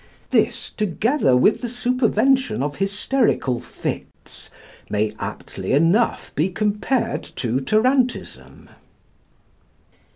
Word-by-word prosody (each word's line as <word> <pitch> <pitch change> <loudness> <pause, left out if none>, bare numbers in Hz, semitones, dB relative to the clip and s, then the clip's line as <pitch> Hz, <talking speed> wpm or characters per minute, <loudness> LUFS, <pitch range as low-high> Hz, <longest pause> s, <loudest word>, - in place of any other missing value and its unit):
This, - - +1
together 210 - +1
with 165 - +3
the 245 - -2
supervention 250 - +1
of 145 0 -3
hysterical 195 - 0
fits, - - -7 0.4
may 105 0 0
aptly 95 +5 -5
enough 165 - +2
be 160 +6 +1
compared 215 +5 -1
to 125 +1 -1
tarantism. 250 - 0
210 Hz, 90 wpm, -22 LUFS, -, 0.4 s, with